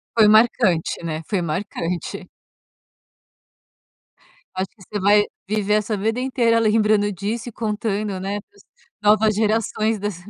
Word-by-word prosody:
Foi 220 -2 +6
marcante, 215 -7 +3
né, 160 -1 -3
foi 195 -4 0
marcante. 170 +1 -4 2.3
Acho 185 0 -2
que 195 - -19
você 205 +2 -5
vai 205 +2 +5 0.2
viver 210 0 +1
essa 215 0 0
vida 225 +5 -1
inteira 240 -3 +2
lembrando 210 -1 +2
disso 210 +5 -4
e - - -11
contando, 210 -3 -2
né, 200 +2 -3
para 405 - -37
as - - -18 0.4
novas 215 0 +4
gerações 220 0 0
das 205 -2 -3
210 Hz, 135 wpm, -21 LUFS, 195-220 Hz, 2.3 s, Foi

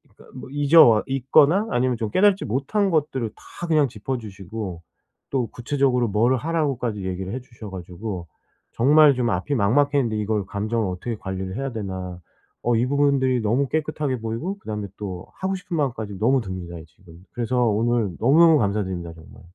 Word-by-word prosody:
그니까 - - -18
뭐 130 - -9
잊어 145 +3 +6
와 110 -3 +4
있거나 140 - +3
아니면 125 0 +1
좀 110 -2 -3
깨닫지 200 0 +3
못한 140 - 0
것들을 140 -7 0 0.3
다 175 - -4
그냥 155 -4 +3
짚어 120 +4 -4
주시고 100 -4 -7 0.5
또 130 -4 0
구체적으로 125 -1 0
뭘 115 +6 +2
하라고까지 130 - -2
얘기를 95 +2 -4
해 130 - -3
주셔 115 -4 -11
가지고 90 0 -6 0.5
정말 145 +4 +6
좀 125 -2 0
앞이 105 +10 -1
막막했는데 125 +1 +2
이걸 105 -1 -1
감정을 105 +2 -2
어떻게 100 +6 -4
관리를 95 -1 -5
해야 135 -1 -3
되나? 95 -5 -5 0.4
어 120 0 +2
이 115 +2 +2
부분들이 135 -2 +2
너무 120 +6 +1
깨끗하게 150 -4 -2
보이고 115 - -4
그다음에 105 - -5
또 95 -4 -6
하고 190 +1 -1
싶은 180 -2 -5
마음까지 110 -9 -2
너무 130 +4 +3
듭니다, 95 -4 -6
지금. 85 +1 -18
그래서 120 0 -2
오늘 115 -2 +1
너무너무 155 +6 +6
감사드립니다, 95 -5 -2
정말. 80 +6 -15
120 Hz, 395 characters per minute, -23 LUFS, 100-140 Hz, 0.5 s, 잊어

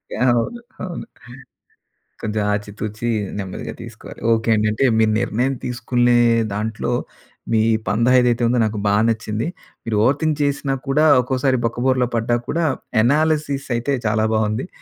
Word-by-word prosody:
Yeah! 125 - +2
అవును. 240 - -4 0.2
అవును. 180 +1 -5 1.2
కొంచెం 105 -1 -2
ఆచి 105 0 -3
తూచి 110 +2 -3 0.3
నెమ్మదిగా 95 -2 -5
తీసుకోవాలి. - - -11
ఓకే 115 0 0
అండి. 105 0 +1
అంటే 125 +5 0
మీరు 110 -1 +3
నిర్ణయం 125 +4 0
తీసుకునే 120 0 +1 0.4
దాంట్లో 110 +1 -3 0.6
మీ 110 - +3 0.3
పందా 115 +5 +2
ఏదైతే 120 -1 +1
ఉందో 120 +1 +2
నాకు 110 -1 -2
బాగా 105 +1 +3
నచ్చింది. 110 +2 -2 0.4
మీరు 110 -2 -1
ఓవర్ 135 +4 +3
థింక్ 155 -2 +1
చేసినా 140 -1 0
కూడా 150 +3 +3 0.2
ఒక్కోసారి 130 +1 0
బొక్కబోరల 125 +2 +1
పడ్డా 115 +1 +1
కూడా 170 +1 0 0.4
ఎనాలిసిస్ 145 +1 +1
అయితే 130 +4 -1
చాలా 110 +1 +1
బాగుంది. 110 +4 0
120 Hz, 140 wpm, -20 LUFS, 110-135 Hz, 1.2 s, మీరు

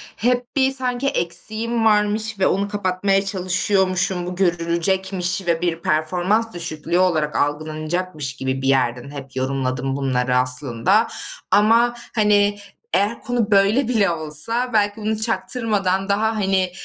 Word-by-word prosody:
hep 245 +1 -1
bir 265 -1 +3
sanki 255 0 -2
eksiğim 225 +2 -1
varmış 210 0 +1
ve 190 - +3
onu 200 +1 0
kapatmaya 195 0 0
çalışıyormuşum, 185 -1 +1
bu 180 0 -5
görülecekmiş 180 +1 0
ve 170 -1 +1
bir 170 -2 -1
performans 180 +9 0
düşüklüğü 170 0 -2
olarak 160 -5 +1
algılanacakmış 155 0 -2
gibi 130 -1 -3
bir 135 - -2
yerden 130 -1 +1
hep 135 -2 -9
yorumladım 130 0 -2
bunları 125 -2 0
aslında. 130 - +2 0.4
Ama, 230 +3 +4 0.2
hani, 205 -2 +3 0.4
eğer 210 +4 +1
konu 240 -3 -1
böyle 205 +6 +3
bile 220 -6 +2
olsa, 170 +10 0
belki 205 0 +1
bunu 215 +1 -1
çaktırmadan 200 -3 0
daha, 220 +3 +1
hani, 190 -3 0
190 Hz, 130 wpm, -21 LUFS, 155-215 Hz, 0.4 s, Ama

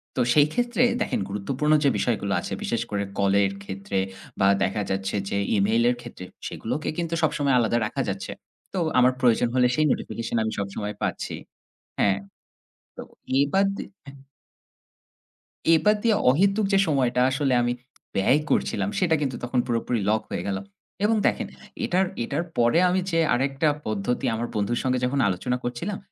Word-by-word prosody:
তো 125 - +1
সেই 145 -1 +5
ক্ষেত্রে 245 0 +1 0.2
দেখেন - - 0
গুরুত্বপূর্ণ 130 +10 0
যে 140 - +5
বিষয়গুলো 100 -5 0
আছে - - -5
বিশেষ 115 -1 -1
করে 100 -1 0 0.2
কলের 100 0 +3
ক্ষেত্রে 100 0 -3 0.4
বা 95 - +4 0.2
দেখা 100 +3 0
যাচ্ছে 95 +1 -2
যে 100 - -1 0.2
ইমেইলের 115 +5 +3
ক্ষেত্রে, 120 -6 -9 0.2
সেগুলোকে 130 +7 -3
কিন্তু 170 -1 -2
সবসময় 145 -3 +2
আলাদা 115 0 +2
রাখা - - -2
যাচ্ছে। - - -4 0.4
তো 190 - -1 0.2
আমার 125 +1 +5
প্রয়োজন 120 -1 +4
হলে 125 -1 +5
সেই 155 - +2
নোটিফিকেশন 115 0 -3
আমি 110 - -2
সবসময় 100 +1 -4
পাচ্ছি। - - -2 0.6
হ্যাঁ, 100 -1 +3 0.8
তো - - -6 0.4
এবার 190 +8 +2
দি - - -5 0.2
হ্যাঁ। 140 0 -12 1.6
এবার 210 +6 +4
দিয়ে 225 -3 +3
অহেতুক 195 +8 +3
যে 195 - +5
সময়টা 130 -4 +2
আসলে 135 0 0
আমি 120 - +1 0.4
ব্যয় 125 +10 +3
করছিলাম - - +1
সেটা 175 -4 +3
কিন্তু 135 -4 -1
তখন 120 +1 -1
পুরোপুরি 120 -1 -1
লক 110 0 +2
হয়ে - - -3
গেলো। 95 -1 -1 0.4
এবং 225 +1 +3
দেখেন - - 0 0.4
এটার, 190 -3 +2 0.2
এটার 145 +8 -2
পরে 120 +6 +4
আমি 185 +1 +2
যে 165 - +1 0.2
আরেকটা 135 +4 +1 0.2
পদ্ধতি 110 +3 -1
আমার 120 +2 -3
বন্ধুর 110 +3 0
সঙ্গে 130 -1 +1
যখন 135 +2 0
আলোচনা 100 +7 -1
করছিলাম, 145 +12 -3
125 Hz, 160 wpm, -25 LUFS, 105-150 Hz, 1.6 s, সেই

